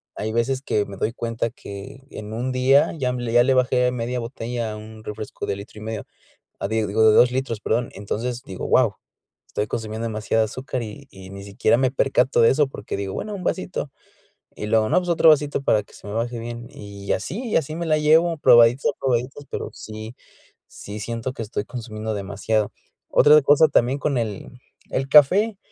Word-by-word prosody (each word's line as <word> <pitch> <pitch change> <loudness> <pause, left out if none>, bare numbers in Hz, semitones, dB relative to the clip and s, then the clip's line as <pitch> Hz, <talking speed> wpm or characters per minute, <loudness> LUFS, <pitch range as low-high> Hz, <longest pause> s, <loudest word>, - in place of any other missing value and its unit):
hay 110 +1 -3
veces 130 +3 0
que 105 -6 0
me 100 -1 -9
doy 110 +4 -1
cuenta 115 -1 -2
que 100 +7 -10
en 105 +1 -8
un 125 +3 -2
día 130 +2 +4
ya 125 -3 -1
me, 120 -2 -3
ya 120 +1 +6
le 135 +1 +3
bajé 125 -1 +2
media 125 0 -3
botella 115 -1 -4
a - - -6
un 110 0 -11
refresco 105 +1 -6
de - - -2
litro 100 +2 -11
y - - -9
medio, 110 -1 -5 0.6
ah, 100 - -2
digo, 110 0 +2
de 110 - +5
2 120 +2 +6
litros, 125 -4 -2
perdón, 115 +2 0
entonces, 120 +5 -4
digo, 95 - -6
wao, - - +3 0.5
estoy 105 - -2
consumiendo 110 +1 -4
demasiada 110 0 0
azúcar, 130 +3 -4
y 115 +6 -9
y 95 -1 -12
ni 100 0 -9
siquiera 100 +3 +2
me 130 +1 +2
percato 130 -2 +2
de 115 - +6
eso 145 0 +2
porque 105 -7 -6
digo: 100 -1 -4
"Bueno, 210 -1 -4
un 190 - -6
vasito", 180 -6 -2 0.7
y 105 - -5
luego, 110 0 +2
no, - - +3
pues: 180 - -6
"Otro 165 -1 +5
vasito 150 -2 +3
para 105 -5 +2
que - - -23
se - - -15
me 105 - -6
baje 120 +2 -2
bien", 120 +1 -7
y 100 -1 -7
así 190 - -4
y - - -1
así 155 0 0
me 170 +1 -3
la 155 -1 +2
llevo, 160 +2 +4
probadita 120 +2 +5
probaditas, 130 +2 -1
pero - - -4
sí 110 +2 -9 0.5
sí 105 +1 -9
siento 115 +4 -4
que 115 - -7
estoy 105 -1 -3
consumiendo 110 -3 -5
demasiado. 100 +2 -1 0.4
Otra 150 +1 +6
cosa 145 +3 +5
también 130 0 +2
con 140 -2 0
el 110 -4 -4 0.4
el 135 +1 -1
café, 190 +10 +5
115 Hz, 200 wpm, -23 LUFS, 110-135 Hz, 0.7 s, ya